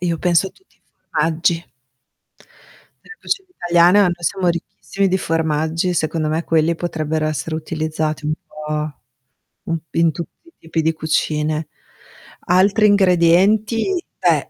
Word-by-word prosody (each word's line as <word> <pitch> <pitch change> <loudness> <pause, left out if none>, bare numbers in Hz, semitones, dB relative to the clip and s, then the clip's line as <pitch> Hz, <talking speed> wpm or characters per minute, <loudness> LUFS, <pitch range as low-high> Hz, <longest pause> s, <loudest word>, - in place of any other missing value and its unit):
io 170 -2 -1
penso 180 +1 +2
a - - -7
tutti 380 - -30
i - - -43
formaggi. 165 +2 -2 1.3
Nella 450 - -13
cucina 385 -1 -3
italiana 175 - +4
noi 180 -2 +2
siamo 180 +1 0
ricchissimi 190 +3 -2
di 190 +1 +1
formaggi, 160 +1 0
secondo 155 -1 -1
me, 160 +2 -1
quelli 165 +1 +2
potrebbero 160 -2 -2
essere 155 +1 -3
utilizzati 155 -1 -3
un 155 - +1
po' 150 0 -4 0.7
un 165 -1 -2
p - - -20
in 165 -1 +3
tutti 170 - -9
i 335 - -19
tipi 165 0 -3
di 160 +1 +1
cucine. 155 0 -1 0.8
Altri 195 +4 +4
ingredienti, 205 - +3
beh, - - +1
165 Hz, 135 wpm, -19 LUFS, 155-185 Hz, 1.3 s, italiana